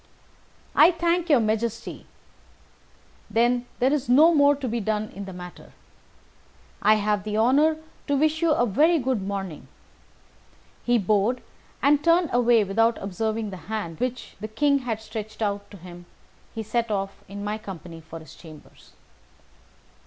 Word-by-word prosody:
"I - - +8
thank 345 0 0
your 285 -5 +6
Majesty. 225 +1 -2 1.2
Then 240 +3 +1
there 260 +3 +2
is 275 -5 -2
no 310 +7 +6
more 285 -1 +5
to 275 -2 -5
be 235 0 -1
done 215 0 -2
in 200 +1 -8
the 190 - -8
matter. 180 -1 -11 1.1
I 215 +1 +5
have 210 -1 0
the 210 0 -3
honour 285 +8 +3 0.3
to 285 -1 +1
wish 310 +2 +1
you 335 - +3
a 270 -6 +3
very 310 - +3
good 255 -6 -1
morning." 195 -4 -5 1.2
He 245 0 +3
bowed, 215 +4 +1 0.4
and, 290 +1 +4
turning 335 -2 +3
away 240 -2 +4
without 225 +4 +2
observing 215 +2 -3
the 190 - -7
hand 205 -7 -4
which 255 0 -4
the 215 - -5
King 280 +6 +2
had 235 -4 -3
stretched 220 -1 -7
out 200 -1 -2
to 200 - -12
him, 175 0 -12 0.5
he 225 - -3
set 230 +2 -1
off 195 -1 -3
in 200 +1 -7
my 210 +1 -3
company 175 -5 -9
for 160 +1 -10
his 160 -1 -13
chambers. 155 -3 -15
220 Hz, 155 wpm, -25 LUFS, 200-260 Hz, 1.2 s, I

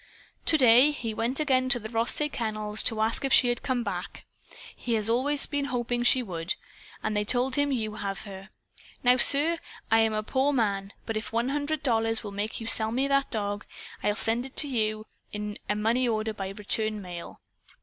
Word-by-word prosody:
"To 315 - +4
day 250 +1 +6
he 240 -7 -4
went 235 +5 -1
again 260 -4 +1
to 265 - +3
the 220 -2 -7
Rothsay 235 +6 0
Kennels 215 -5 -1
to 220 - 0
ask 225 +4 0
if 270 - -1
she 245 - +5
had 240 - -2
come 255 -2 -1
back. 190 -3 -6 0.5
He 235 -2 -2
has 215 -1 -1
always 275 +5 +7
been 285 -1 -2
hoping 245 -2 -2
she 250 +1 +4
would. 175 -2 -4 0.5
And 215 0 -2
they 210 - +1
told 250 +4 +1
him 285 0 +1
you 220 -5 -2
have 200 -2 -5
her. 195 -1 -10 0.5
Now, 250 0 +5
sir, 315 +6 +4 0.3
I 225 - +5
am 225 -1 +2
a 215 0 -2
poor 270 +5 0
man, 200 -5 -1
but 225 -1 -3
if 215 - -6
one 235 +3 -1
hundred 295 +2 -2
dollars 225 -3 0
will 205 - -7
make 205 +2 -4
you 225 - -7
sell 220 -1 +3
me 260 +4 0
that 275 0 +1
dog, 205 -2 -3 0.4
I'll 210 - 0
send 225 +3 -1
it 265 - -16
to 295 - +1
you 215 -4 -2 0.3
in 210 0 -5
a 210 - +1
money 230 +4 +1
order 220 -1 -1
by 195 -2 -5
return 215 +2 -3
mail. 175 -2 -9
225 Hz, 205 wpm, -27 LUFS, 215-255 Hz, 0.5 s, always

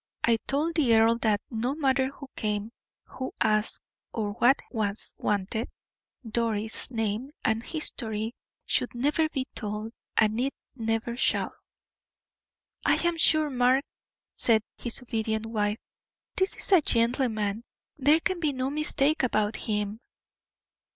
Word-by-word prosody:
I 230 -1 +4
told 300 +5 0
the 275 -8 +4
earl 225 +1 +5
that, 215 -3 +2
no 240 +4 -1
matter 270 -3 +2
who 275 +1 -9
came, 210 0 -2 0.3
who 260 0 -6
asked, 215 -1 +2 0.3
or 210 -2 -2
what 240 +6 +4
was 210 -3 -1
wanted, 210 +3 -1 0.6
Doris' 220 -1 -1
name 225 +1 -2 0.2
and 220 0 +2
history 225 -7 -2 0.3
should 245 - +1
never 295 +5 +2
be 265 -4 -2
told, 215 +1 -4 0.2
and 220 +1 +3
it 270 +2 0 0.2
never 225 0 -1
shall." 245 - +1 1.3
"I - - +4
am 345 - +1
sure, 310 -2 +4
Mark," 255 +2 +3 0.5
said 220 -2 +3
his 240 +1 -3
obedient 220 -2 -1
wife, 210 -1 0 0.6
"this 380 +1 +2
is - - +2
a 370 -4 +7
gentleman; 230 -4 +1 0.3
there 295 +3 +4
can 375 -2 -1
be 305 -4 0
no 260 +1 -2
mistake 305 0 +1
about 215 -4 +1
him." 210 0 -2
230 Hz, 130 wpm, -28 LUFS, 220-270 Hz, 1.3 s, a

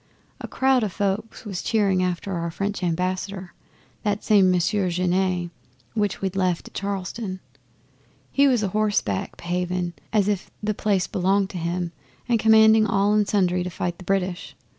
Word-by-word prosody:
A - - -6
crowd 265 -2 +2
o' 210 - 0
folk 200 +4 -2
was 195 -4 -4
cheering 200 -4 +2
after 180 +2 -2
our 170 -1 -2
French 200 +4 -3
Ambassador 185 +1 -2 0.5
that 205 0 -1
same 200 -4 +5
Monsieur 185 +2 +1
Genet 180 0 0 0.4
which 205 -3 -1
we'd 190 -1 -1
left 185 -3 0
at - - -15
Charleston. 195 0 -4 0.9
He 280 0 +4
was 245 -5 +2
a 200 - 0
horseback 205 - -1
behaving 180 0 -2 0.2
as 210 -3 +2
if 205 -3 -1
the 215 0 0
place 200 -3 +1
belonged 195 +1 +1
to 180 - -5
him 170 +1 -2 0.4
and 235 -2 +2
commanding 220 0 +6
all 205 0 +2
and 210 -1 +3
sundry 185 -3 +2
to 180 - -4
fight 175 0 -4
the - - -9
British. 180 -7 -2
190 Hz, 160 wpm, -24 LUFS, 180-210 Hz, 0.9 s, commanding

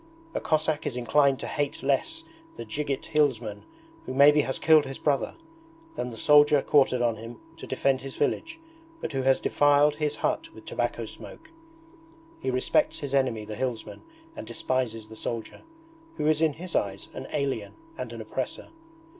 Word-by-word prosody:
A - - -2
Cossack 155 -1 0
is 125 - -3
inclined 135 +3 +3
to - - -4
hate 145 -1 -2
less 325 - 0 0.3
the - - -6
dzhigit 145 -2 -3
hillsman 120 -9 0 0.4
who 130 - -4
maybe 145 +2 +7
has 130 -2 -2
killed 155 -2 +5
his 135 0 -6
brother, 145 -3 0 0.6
than 125 - -3
the 115 - -9
soldier 145 +2 +5
quartered 130 -4 +3
on 115 -2 +1
him 115 +1 -9 0.2
to - - -9
defend 130 0 +1
his 135 0 -7
village, 320 - -1 0.4
but - - -4
who 135 -2 -1
has 130 0 +3
defiled 145 +1 +3
his 150 -1 -1
hut - - -1
with - - -13
tobacco - - -2
smoke. 320 0 -12 0.9
He - - -2
respects 130 0 +2
his 140 -4 -5
enemy 125 -6 +1
the 105 - -6
hillsman 125 -1 -4 0.3
and 300 - -8
despises 115 -4 -2
the 110 - -11
soldier, 115 +1 -5 0.6
who - - -1
is 155 0 +3
in 160 -2 +3
his 175 +4 -8
eyes 100 -1 -1
an 130 - -7
alien 135 -8 -2 0.2
and - - -6
an - - -7
oppressor. - - -4
140 Hz, 170 wpm, -27 LUFS, 125-150 Hz, 0.9 s, maybe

